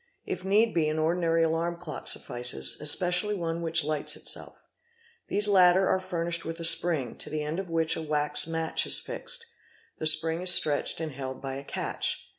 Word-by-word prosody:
If - - -6
need 210 +4 +1
be 160 -3 0
an 155 - -4
ordinary 165 +1 0
alarm 165 +1 -2
clock 170 -3 -7
suffices, 120 - +1
especially 180 +7 +2
one 170 -2 -4
which 165 -1 +1
hghts 150 0 0
itself. - - +2 0.7
These 205 +1 +2
latter 185 -1 +4
are 190 - +1
furnished 170 -2 -4
with 165 +1 -6
a 165 - -1
spring, 165 -5 +3
to - - -7
the 155 -1 -4
end 155 +4 -5
of 190 -2 -7
which 165 -1 0
a - - -6
wax 150 0 -1
match 165 -1 0
is - - +7
fixed; - - -5 0.5
the 155 - +2
spring 160 +2 +2
is 185 - +2
stretched 150 -4 +4
and 160 -2 -5
held 130 -1 -8
by 135 -1 -7
a 135 +1 -7
catch. - - -3
165 Hz, 190 wpm, -26 LUFS, 155-180 Hz, 0.7 s, is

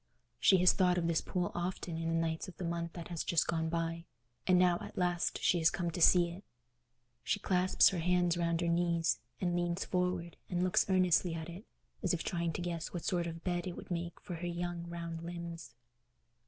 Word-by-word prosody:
She 190 - +6
has 180 0 +6
thought 180 -2 +3
of 170 - 0
this 165 -1 +1
pool 180 -2 -2
often 175 -1 -3
in 165 0 -2
the 165 - 0
nights 165 +1 -1
of 185 - -11
the - - -5
month 170 0 -3
that 170 -2 -8
has 170 -2 -3
just 170 - +2
gone 160 0 -1
by, 165 0 -2 0.4
and 185 -1 +5
now 180 -1 +4
at - - -9
last 175 -1 0
she 175 - +3
is 160 - +5
come 175 -2 -2
to 170 - -4
see 175 0 +6
it. 185 +4 -10 0.8
She 205 - 0
clasps 185 -1 +4
her 185 - -3
hands 175 0 +2
round 170 -1 0
her 170 - 0
knees, 170 -1 +1 0.2
and 175 -2 0
leans 175 +1 -1
forward, 180 -2 -1
and 180 -1 0
looks 185 +2 +2
earnestly 180 -2 +3
at 160 0 -5
it, 180 +7 -9 0.4
as 180 -4 +1
if 165 - -4
trying 170 -2 -1
to - - -4
guess 170 -2 -4
what 175 - -5
sort 175 -2 0
of 165 0 -7
bed 175 -1 -1
it 175 - -5
would - - -10
make 170 0 -3
for 180 -4 -7
her 175 +2 -4
young 175 0 -4
round 170 -1 -5
limbs. 170 -5 -7
175 Hz, 220 wpm, -33 LUFS, 170-180 Hz, 0.8 s, She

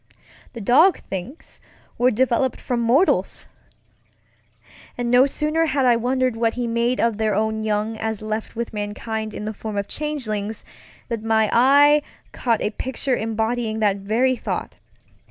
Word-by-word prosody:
The 235 - -7
dog 300 - +5
things 195 - -8 0.4
were 245 +1 +5
developed 255 +2 +1
from 245 -2 -2
mortals! 245 +10 +2 1.5
And 240 -1 -2
no 250 +2 +6
sooner 305 +3 0
had 275 -3 +1
I 245 -1 +5
wondered 255 +1 0
what 225 0 0
he 245 -1 -2
made 235 +2 0
of 230 -2 +1
their 215 -2 +1
own 220 +1 0
young 215 +1 -1
as 220 -1 -3
left 215 +1 -4
with 235 0 -4
mankind 215 +1 -4
in 210 - -6
the 215 - -3
form 215 0 -6
of 200 0 -2
changelings, 225 -9 -4 0.4
than 225 -2 -4
my 220 -1 +2
eye 285 +4 +6 0.3
caught 230 -3 0
a 210 - 0
picture 260 +2 -2
embodying 225 0 -2
that 205 -2 +2
very 230 +6 +1
thought. - - -5
230 Hz, 155 wpm, -22 LUFS, 215-255 Hz, 1.5 s, no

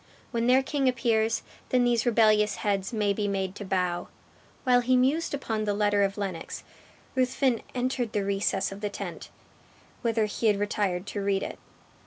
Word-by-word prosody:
When 235 -1 0
their 260 +2 +5
king 275 -1 +1
appears, 230 -2 +1 0.3
then 250 -1 +3
these 240 -1 +2
rebellious 215 -2 +4
heads 195 -2 0
may 210 -3 +1
be 205 0 -1
made 190 -2 -1
to 205 - -7
bow." 180 -2 -1 0.6
While 250 -2 +4
he 255 +1 +2
mused 280 +6 +2
upon 220 -6 -2
the 205 -1 0
letter 205 -1 +2
of 195 0 +1
Lennox, 190 -5 -4 0.5
Ruthven 255 -1 +1
entered 250 -2 -1
the 205 -2 0
recess 195 -1 0
of 195 +1 -8
the 210 - -1
tent, - - -7 0.7
whither 225 -2 +1
he 210 +2 -1
had 210 -2 +4
retired 200 -3 -1
to 205 0 -4
read 195 -1 +1
it. - - -6
215 Hz, 175 wpm, -27 LUFS, 200-245 Hz, 0.7 s, their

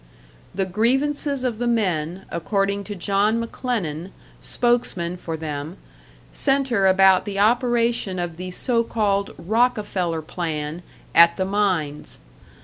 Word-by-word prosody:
The 195 0 0
grievances 270 +7 +1
of 240 -4 -2
the 240 - -1
men, 185 -6 -1
according 200 +3 -1
to 205 - -6
John 200 +5 +1
McLennan, 205 - -3 0.3
spokesman 235 -8 0
for 165 -2 -5
them, 155 +2 -5 0.5
centre 270 -8 +1
about 190 0 +5
the 200 -2 -4
operation 235 -2 +2
of 175 -2 -4
the 185 +1 -5
so 230 +5 +1
called 200 -3 -1
"Rockefeller 200 -6 0
plan" 155 -1 -4 0.3
at 170 0 +7
the 190 - 0
mines. 185 -7 -1
195 Hz, 120 wpm, -22 LUFS, 175-230 Hz, 0.5 s, at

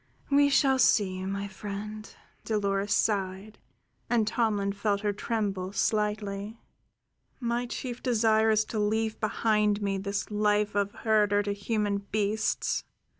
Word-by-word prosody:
"We 285 0 +5
shall 270 -1 +3
see, 185 -6 +3
my 200 +1 -3
friend," 210 +2 -7 0.3
Dolores 200 -2 -1
sighed, 200 0 0 0.5
and 235 -3 +3
Tomlin 210 -3 0
felt 200 0 -1
her 205 -1 0
tremble 200 -4 -2
slightly. 210 0 -1 0.8
"My 240 0 -1
chief 245 0 -5
desire 220 -2 +3
is 215 0 +3
to 220 - -4
leave 220 +1 0
behind 210 -1 +1
me 195 -1 0
this 200 +2 -3
life 210 0 +1
of 200 0 0
herder 210 -2 +2
to 205 0 -1
human 205 0 -1
beasts. 215 +1 0
210 Hz, 125 wpm, -28 LUFS, 200-220 Hz, 0.8 s, We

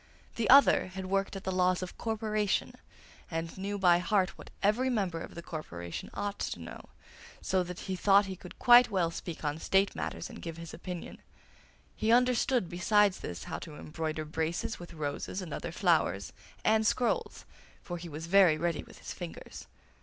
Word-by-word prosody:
The 230 -3 -1
other 275 -6 +7
had 190 0 -6
worked 195 +1 -1
at 195 - -6
the 190 - -2
laws 185 0 +2
of 180 - -7
corporation, 215 -2 -1 0.6
and 165 0 -4
knew 200 +2 -3
by 175 -3 +5
heart 185 +1 +2
what - - -12
every 225 +6 +3
member 190 -9 -1
of - - -9
the 170 - -7
corporation 85 - -6
ought 205 0 -3
to - - -3
know, - - -9 0.5
so 190 - +1
that 180 0 -6
he 190 - -3
thought 200 +2 +5
he 190 -1 -5
could 180 0 -12
quite 245 0 +7
well 180 -5 +1
speak 165 -2 -6
on 150 +1 -1
State 195 +4 +2
matters - - -4
and - - -10
give 165 -1 -6
his 165 -1 -8
opinion. 180 0 -7 0.8
He 220 +1 +1
understood, 250 -2 +3
besides 190 +3 +3
this, 85 -1 -6
how - - -5
to 155 - -9
embroider 155 0 -4
braces 160 +2 -2
with 175 -1 -10
roses 150 +4 -3
and 180 -4 -6
other - - -4
flowers, - - +1 0.3
and 220 0 +4
scrolls, 245 +2 0 0.4
for 175 -2 -5
he 170 0 -8
was 155 +1 -6
very 180 -3 +5
ready 170 0 -1
with - - -15
his - - -7
fingers. - - -8
185 Hz, 185 wpm, -31 LUFS, 165-205 Hz, 0.8 s, other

